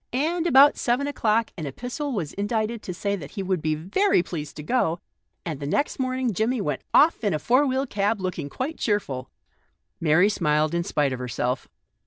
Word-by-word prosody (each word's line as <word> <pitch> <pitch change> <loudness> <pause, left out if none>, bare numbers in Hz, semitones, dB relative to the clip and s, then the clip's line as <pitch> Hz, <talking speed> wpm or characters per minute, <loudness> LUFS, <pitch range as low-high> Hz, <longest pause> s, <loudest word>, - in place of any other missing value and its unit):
And 325 +6 0
about 280 -1 +6
seven 250 +3 +1
o'clock 230 -5 +1
an 155 - -4
epistle 250 - -4
was 180 - -3
indited 215 +2 -2
to 185 - -6
say 200 +3 -2
that 150 -7 -9
he 195 - -3
would 185 -3 -1
be 155 0 0
very 190 - +2
pleased 155 -4 -6
to 150 - -7
go, 175 - +1 0.5
and 155 -5 -4
the 140 - -4
next 285 - 0
morning 255 -2 0
Jimmie 225 +6 0
went 150 -9 -2
off 310 -4 +4
in 200 -6 +1
a - - +1
four 255 - +3
wheel 265 +1 0
cab, 205 -2 0
looking 180 -6 -3
quite 275 - -4
cheerful." 145 - -1 0.7
Mary 165 +4 +4
smiled 155 -6 +1
in 170 0 0
spite 145 -5 0
of 130 - -5
herself. 125 +1 -2
200 Hz, 195 wpm, -25 LUFS, 155-255 Hz, 0.7 s, about